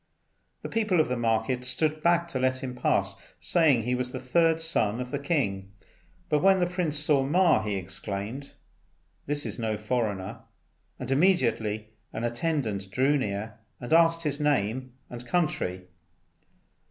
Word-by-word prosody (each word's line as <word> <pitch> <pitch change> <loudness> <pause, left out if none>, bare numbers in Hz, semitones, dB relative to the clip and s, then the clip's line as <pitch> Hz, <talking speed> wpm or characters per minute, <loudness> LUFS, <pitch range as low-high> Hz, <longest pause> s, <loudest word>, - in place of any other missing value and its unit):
The - - -3
people 215 -6 +1
of 155 - +2
the 125 - 0
market 115 +2 0
stood 155 +4 0
back 170 +1 +3
to 135 - -2
let 130 +1 0
him 130 -1 -4
pass, 100 -5 +1 0.2
saying 150 -9 +3
he 125 +2 -1
was 125 0 -2
the 130 - -5
third 165 +5 +2
son 120 -9 0
of 125 0 -5
the 145 - -2
king; 100 - -1 0.6
but 150 - +1
when 195 0 +5
the 175 - +3
Prince 175 -4 -1
saw 150 -2 +3
Ma, 160 -1 +3
he 105 -2 -2
exclaimed, 100 +7 -5 0.7
"This 145 0 -1
is - - -4
no 110 -2 -1
foreigner," 110 -1 -2 0.6
and 125 +1 -5
immediately 115 - +1 0.2
an 115 - -4
attendant 120 - -2
drew 130 +9 +2
near 110 -3 -3 0.2
and 120 +5 -3
asked 165 0 +4
his 145 -2 -1
name 130 -3 0
and 120 0 -8
country. 120 - -1
130 Hz, 155 wpm, -27 LUFS, 110-155 Hz, 0.7 s, when